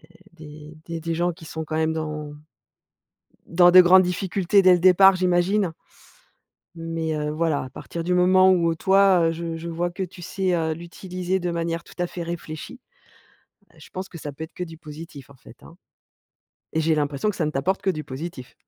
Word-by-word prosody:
heu, - - -18 0.2
des 155 -1 -12
des 165 -1 -5
des 165 +1 -3
gens 175 +2 0
qui 165 -1 -14
sont 160 0 -5
quand 155 0 -3
même 160 0 +1
dans 150 -2 -5 1.1
dans 175 +1 +5
de 185 +1 +10
grandes 185 +1 +6
difficultés 185 +2 +1
dès 185 -1 +6
le 175 - +3
départ, 185 +1 +6
j'imagine 180 +1 +1 1.0
mais, 165 -1 -3
heu, 150 0 -2
voilà, 155 -2 0
à 130 - -8
partir 170 +5 -7
du 180 +2 0
moment 185 +1 +5
où, 170 -2 +2
heu, - - -3
toi, 190 -1 +4
heu, - - -1
j 165 0 -5
je 170 +1 -7
vois 170 +1 -2
que 190 +2 -4
tu 180 0 -10
sais, 185 +1 -2
heu, 160 -1 -1
l'utiliser 180 +2 -4
de 175 -1 -3
manière 165 -1 -3
tout - - -15
à 175 - 0
fait 175 - -7
réfléchie. 170 +7 -7 0.9
Heu, - - -26
je - - -14
pense 190 +1 -6
que 170 - -10
ça 145 -2 -7
peut 140 - -10
être 160 - -8
que 180 - -4
du 165 -2 -11
positif 150 -3 -11
en 140 - -16
fait, - - -17
hein - - -15 1.0
et 160 - +1
j'ai 160 0 +2
l'impression 145 +5 -1
que 205 - -3
ça 160 - 0
ne 150 - -2
t'apporte 170 +8 -1
que 195 - 0
du 155 -5 -2
positif. 135 -1 -8
170 Hz, 210 wpm, -23 LUFS, 160-180 Hz, 1.1 s, de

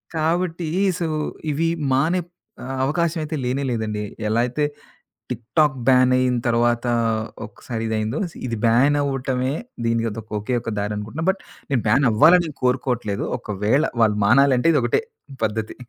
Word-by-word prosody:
కాబట్టి 165 +1 0 0.3
సో 170 - -1 0.4
ఇవి 165 +3 0 0.2
మానెప్ 170 +6 +1 0.3
ఆహ్, 135 +1 -4
అవకాశమైతే 160 0 -1
లేనే 130 +3 -1
లేదండి. 110 -2 -2 0.3
ఎలా 110 +2 +1
అయితే 145 +5 -1 0.7
టిక్ 120 -1 -4
టాక్ 150 -4 +4
బ్యాన్ 130 -1 +5
అయిన 125 -1 +2
తర్వాత 120 +1 +2 0.6
ఒకసారి 110 +2 -6
ఇదైందో. 110 +4 -1 0.3
ఇది 115 - -3
బ్యాన్ 125 +6 +4
అవ్వటమే 135 -1 -1 0.3
దీనికదొక్ 115 -1 -2
ఒకే 115 +5 -2
ఒక 115 - -4
దారి 105 +1 -2
అనుకుంటున్నా. 110 +10 -5
బట్ 190 - -11 0.3
నేను 130 - +2
బ్యాన్ 135 +6 +4
అవ్వాలనేం 160 +6 +5
కోరుకోవట్లేదు. 125 -5 0
ఒకవేళ 105 +8 0 0.2
వాళ్ళు 105 -2 +3
మానాలంటే 130 +5 +4
ఇదొకటే 120 -4 +2 0.4
పద్ధతి. 110 0 -3
125 Hz, 130 wpm, -22 LUFS, 115-150 Hz, 0.7 s, బ్యాన్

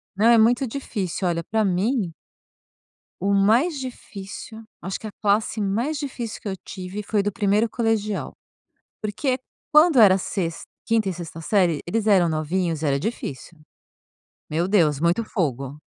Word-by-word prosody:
Não, 215 +4 +3
é 235 -1 +7
muito 240 +4 +4
difícil, 200 -8 -3
olha, 170 -1 -1
pra 220 +3 0
mim 195 0 0 1.1
o 200 +2 +1
mais 240 - +3
difícil, 220 -3 -8 0.2
acho 190 +1 -4
que 220 - -7
a - - -7
classe 215 +1 +1
mais 230 +10 0
difícil 245 -5 -5
que - - -7
eu 190 - -3
tive, 190 +2 -6
foi 205 0 +1
do 205 - 0
primeiro 210 0 +1
colegial. 220 -3 -1 0.7
Porque 255 +5 -1 0.4
quando 305 -3 +6
era 195 -3 +7
sex 175 -3 -3 0.2
quinta 225 -4 +2
e - - -2
sexta 165 -1 -8
série, 175 -5 +2
eles 220 +3 -1
eram 185 -4 +5
novinhos, 160 +1 -1
era 140 -2 +1
difícil, 165 - -5 0.9
meu 170 +4 0
Deus, 155 -8 +3
muito 175 +7 +2
fogo, 140 - -2
200 Hz, 150 wpm, -23 LUFS, 175-225 Hz, 1.1 s, é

